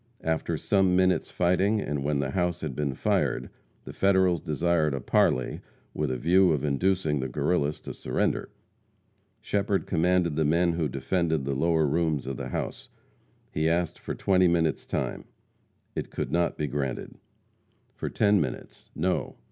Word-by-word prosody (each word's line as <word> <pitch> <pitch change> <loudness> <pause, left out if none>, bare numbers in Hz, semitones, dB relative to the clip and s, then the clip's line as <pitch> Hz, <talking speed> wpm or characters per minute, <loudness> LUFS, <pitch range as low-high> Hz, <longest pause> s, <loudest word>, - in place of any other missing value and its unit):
After 80 0 -1
some 95 +1 +2
minutes' 95 0 +2
fighting, 95 +4 +2
and 75 -7 -2
when 75 0 0
the 70 -1 -1
house 90 -2 -1
had 75 -5 -4
been 70 -2 -2
fired, - - 0 0.3
the - - -9
Federals 95 -3 +3
desired 80 -2 +1
a - - -3
parley 65 0 +1 0.3
with 75 -2 -1
a 65 - -1
view 90 +5 +4
of 75 -2 -1
inducing 80 +1 +1
the 65 - -2
Guerrillas 75 +2 0
to - - -7
surrender. - - -1 0.9
Shepherd 100 -3 0
commanded 90 -1 +1
the 80 - +1
men 85 +3 +2
who 80 -3 -1
defended 80 +2 -1
the 70 - -1
lower 80 +3 +2
rooms 80 0 0
of 65 -2 -4
the - - -5
house. - - -4 0.6
He 80 +1 +1
asked 85 0 0
for - - -5
twenty 95 -2 +3
minutes 85 -2 +1
time. - - -3 0.7
It - - -3
could - - -4
not 85 0 +1
be 75 - -1
granted. 70 -2 -4 0.7
For - - -4
ten 105 -3 +3
minutes. 65 -5 -6
No. 90 +4 -1
80 Hz, 160 wpm, -27 LUFS, 75-90 Hz, 0.9 s, view